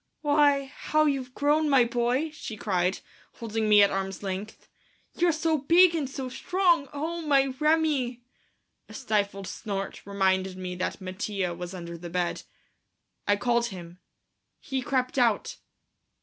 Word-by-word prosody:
"Why, 290 -2 +3
how 305 +3 0
you've 265 -3 -1
grown, 300 +2 +2
my 270 -3 +6
boy," 245 +6 0
she 265 -8 -8
cried, 185 -3 0 0.3
holding 225 -1 -2
me 210 -1 +8
at 200 - +3
arms' 195 0 -3
length, 195 +2 -6 0.5
"you're 350 0 +2
so 315 0 0
big 340 +5 +5
and 300 -5 -2
so 265 -1 -5
strong! 340 +2 +1
Oh, 320 +4 -3
my 275 -4 +2
Remi!" 300 -6 +1 0.7
A - - -11
stifled 205 -5 -1
snort 195 +1 -5
reminded 190 -1 0
me 185 -1 -5
that 185 - -3
Mattia 185 -1 -3
was 175 +2 -7
under 170 -1 -7
the 175 0 -7
bed. 175 0 -1 0.9
I 205 - +4
called 235 +2 +1
him. 175 -3 -10 0.6
He 265 -3 -3
crept 255 0 -1
out. 230 -4 +1
240 Hz, 145 wpm, -27 LUFS, 195-290 Hz, 0.9 s, me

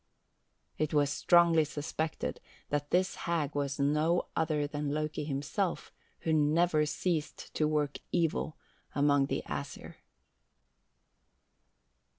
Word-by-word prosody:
"It 155 0 0
was 145 -1 +3
strongly 170 +1 +5
suspected 155 +1 -3 0.3
that 145 0 -1
this 185 +1 +2 0.2
hag 155 -4 0
was 140 0 -2
no 150 +5 +2
other 155 -2 +1
than 145 0 -3
Loki 150 0 -2
himself 150 +6 -2 0.3
who 160 - 0
never 155 +1 +3
ceased 160 -1 -2
to 155 - +2
work 150 -2 0
evil 165 -2 0 0.4
among 145 -1 +3
the - - -2
Æsir." - - -6
150 Hz, 110 wpm, -31 LUFS, 145-160 Hz, 0.4 s, strongly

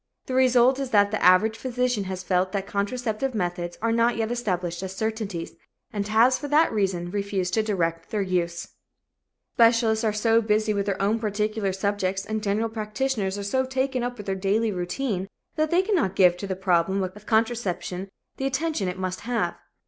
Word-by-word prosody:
The 260 - -5
result 255 0 +4
is 270 -2 -3
that 205 -3 +4
the 215 - -2
average 185 +5 +5
physician 250 -4 -1
has 185 0 -5
felt 185 0 0
that 195 -1 -1
contraceptive 225 +5 -2
methods 175 -3 -3
are 230 - +2
not 230 +1 +2
yet 225 0 -1
established 180 -8 -2
as 190 0 -5
certainties 215 -5 -3 0.4
and 205 -1 -2
has, 230 +4 +4
for 290 - -5
that 300 0 +3
reason, 185 -4 -1
refused 200 -2 -2
to 220 - +3
direct 170 -6 -1
their 210 -2 -1
use. 175 -2 -2 0.8
Specialists 230 -1 +4
are 220 - +2
so 225 +2 +3
busy 215 0 +1
with 200 -1 -1
their 195 -2 -1
own 205 +3 +1
particular 210 -1 -1
subjects 195 0 -1
and 220 0 -3
general 210 +2 0
practitioners 215 -2 -2
are 200 - -4
so 260 +7 +1
taken 260 0 -1
up 245 0 -3
with 205 - -8
their 195 - -1
daily 205 +4 +1
routine 190 +2 -2 0.3
that 310 0 +1
they 350 +3 +3
cannot 360 - 0
give 180 -2 +5
to 200 - -5
the 190 - -2
problem 190 +1 +1
of 190 +3 -7
contraception 220 -5 -1 0.3
the 270 - -1
attention 270 - -1
it 180 0 -3
must 185 0 -3
have. 240 +1 -1
210 Hz, 185 wpm, -25 LUFS, 190-235 Hz, 0.8 s, average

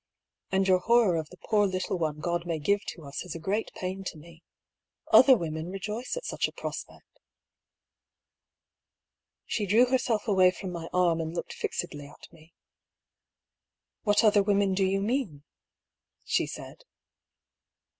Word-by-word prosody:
" - - -49
And 190 0 +2
your 185 -1 +4
horror 230 -2 +3
of 155 -1 -4
the 180 - -14
poor 205 0 +2
little 185 -1 -2
one 155 -2 -1
God 175 0 -1
may 165 -2 -1
give 200 +7 +1
to 165 - -7
us 140 -1 -6
is 180 -3 -7
a - - -5
great 200 +7 -1
pain 190 +1 -4
to 170 - -5
me. 165 +1 -15 0.7
Other 260 -1 +8
women 160 -1 -4
rejoice 210 - -4
at - - -6
such - - -1
a - - -10
prospect." - - -8 2.3
She 210 -3 -2
drew 225 +6 +5
herself 245 -4 0
away 190 -3 +5
from 185 +1 -6
my 170 -1 -6
arm 175 -2 +2
and 160 +1 -5
looked 170 - -4
fixedly 145 -5 -4
at 145 - -16
me. 160 0 -19 0.8
" - - -63
What 205 0 +3
other 210 -2 +5
women 200 -1 +2
do 190 0 +2
you 195 +1 0
mean? 205 - -2 0.4
" - - -50
she - - +1
said. - - -9
185 Hz, 165 wpm, -28 LUFS, 170-205 Hz, 2.3 s, Other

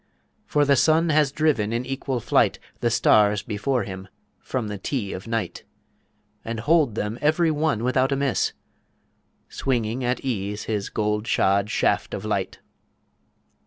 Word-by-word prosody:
for 150 -1 +2
the 140 0 +4
sun 160 +5 +3
has 150 -2 +3
driven 140 -9 +1
in 120 +2 -2
equal 135 -1 -3
flight - - +2 0.2
The 120 - +1
stars 105 -3 +3
before 115 +4 -1
him 95 0 -7 0.3
from 125 -4 -3
the 105 -1 -5
Tee 105 -2 -3
of 95 +4 -7
Night, 115 -1 -3 0.8
And 115 -1 -4
holed 150 -4 +3
them 110 +2 -3
every 160 +2 +3
one 150 -7 0
without 130 +2 +2
a - - +2
miss, 140 -1 0 0.9
Swinging 120 -1 -2
at 125 +1 0
ease 105 -5 -3
his 105 -3 -3
gold 105 +1 -1
shod 100 +2 +2
Shaft - - 0
of - - -6
Light. - - -2
120 Hz, 150 wpm, -24 LUFS, 105-140 Hz, 0.9 s, the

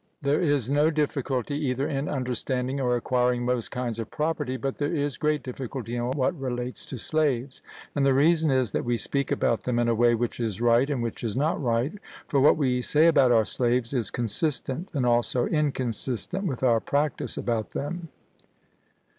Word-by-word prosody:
There 140 +1 +1
is 145 -8 +1
no 145 +3 +3
difficulty 145 -3 -1
either 130 +3 0
in 140 -1 -2
understanding 130 0 -2
or 125 -1 +2
acquiring 125 0 +1
most 125 -2 -1
kinds 120 -2 -3
of 115 - -4
property, 150 -4 -2
but 135 +2 -4
there 145 +1 0
is 145 -4 -1
great 150 -1 0
difficulty 125 -2 -5
in 120 0 -1
what 135 +5 +1
relates 125 -1 -4
to 130 - -6
slaves. 140 -1 0 0.3
And 145 - 0
the 135 -1 +4
reason 160 +3 +4
is, 130 -5 +1
that - - -1
we 120 -1 0
speak 140 +4 -1
about 115 - +1
them 125 -1 -1
in 120 0 +2
a 115 - +3
way 120 +1 +4
which 120 +1 -2
is 110 -4 -2
right 120 +3 +3
and 135 -5 -1
which 115 0 -4
is 115 0 -2
not 150 +3 +1
right; 120 +2 0 0.3
for 140 - +2
what 145 +4 +5
we 130 -4 +1
say 150 +5 +3
about 145 -7 +5
our 110 -2 +4
slaves 120 +2 0
is 120 -6 -1
consistent 135 - -2
and 130 -3 +1
also 120 +1 +2
inconsistent 140 - -1
with 130 -5 -4
our 120 -3 +4
practice 145 +5 -1
about 115 -3 -1
them. 165 +3 -5
130 Hz, 190 wpm, -26 LUFS, 120-145 Hz, 0.3 s, what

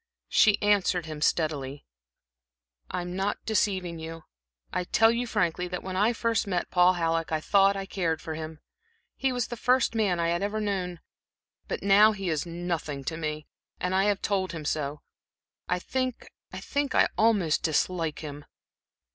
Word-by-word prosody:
She 210 -2 +5
answered 195 -4 +2
him 155 -2 -7
steadily; 145 -3 0 1.0
"I'm 175 0 -4
not 195 +2 -2
deceiving 185 -5 0
you. 165 0 -7 0.5
I - - 0
tell 225 +5 +4
you 240 +1 -1
frankly 180 -3 0
that 180 0 -5
when 185 0 -5
I 210 +5 +3
first 230 -2 0
met 180 -3 -2
Paul 180 0 +5
Halleck 165 -2 -1
I 155 - +1
thought 195 +4 +4
I 195 - -4
cared 170 -4 -1
for 160 - -5
him 155 0 -7 0.5
he 270 -1 0
was 245 -1 -2
the 240 - -4
first 250 +1 +2
man 205 -6 +1
I 170 0 +1
had 170 +1 0
ever 205 +2 -1
known; 185 -5 -2 0.7
but - - -4
now 205 +2 +6
he 195 -3 -3
is 155 +2 -2
nothing 170 -5 -3
to 160 - -3
me, 155 -2 -4 0.3
and 180 +1 -1
I 190 +1 +3
have 205 -2 +1
told 190 -3 0
him 160 -3 -6
so 145 -1 -2 0.7
I 180 - +2
think 255 +6 -3 0.3
I 285 -1 +1
almost 205 -8 +3
dislike 165 0 0
him." 145 -1 -7
180 Hz, 165 wpm, -27 LUFS, 160-205 Hz, 1.0 s, now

